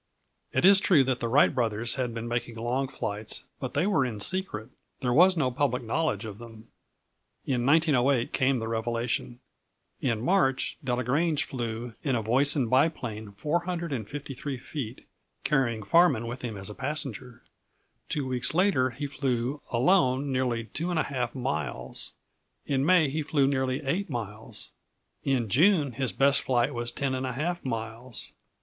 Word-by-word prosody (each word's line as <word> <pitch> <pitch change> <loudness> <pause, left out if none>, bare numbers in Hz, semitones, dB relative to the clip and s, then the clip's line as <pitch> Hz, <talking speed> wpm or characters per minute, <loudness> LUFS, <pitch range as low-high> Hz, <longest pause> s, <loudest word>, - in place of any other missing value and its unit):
It - - +2
is 195 0 +8
true 170 -8 +5
that 130 -1 -1
the 120 - -1
Wright 135 +6 +4
brothers 115 -1 +1
had 125 -2 -1
been 115 0 -5
making 120 -1 -3
long 120 +4 -1
flights, 105 -3 -4 0.2
but 130 -2 -5
they 145 +5 +2
were 195 -9 +3
in 115 -5 -3
secret. 160 - 0 0.3
There 125 -1 +1
was 180 +5 +6
no 130 -5 +1
public 125 -1 0
knowledge 115 -3 -1
of 105 -1 -8
them. 115 -1 -12 0.8
In 125 -2 0
1908 140 -5 +3
came 130 0 +2
the 115 -1 -3
revelation. 115 +2 -2 0.6
In 115 -4 0
March, 135 - +1
Delagrange 135 +5 +1
flew 120 -2 -5
in 135 -4 0
a 115 - -1
Voisin 135 +3 +2
biplane 120 -6 0
453 145 - -3
feet, 125 -2 -6 0.4
carrying 120 -7 +1
Farman 165 - +4
with 120 +2 -6
him 115 -4 -5
as 95 0 -2
a - - -7
passenger. 130 -3 -4 0.7
Two 145 -3 -1
weeks 125 +2 +1
later 175 -9 +3
he 135 +4 -5
flew 135 -1 -2
alone 135 0 +3
nearly 125 -3 0
2½ 140 -6 -2
miles. 80 - -3 0.5
In 135 -1 0
May 165 -1 +5
he 155 +2 -1
flew 145 -2 +2
nearly 130 +1 0
8 180 +9 -1
miles. 110 -2 -4 0.5
In 130 -4 +1
June 150 - +4
his 130 0 0
best 140 +3 +4
flight 125 +1 +1
was 120 0 -1
10½ 135 +6 -2
miles. 115 0 -5
130 Hz, 145 wpm, -28 LUFS, 115-145 Hz, 0.8 s, is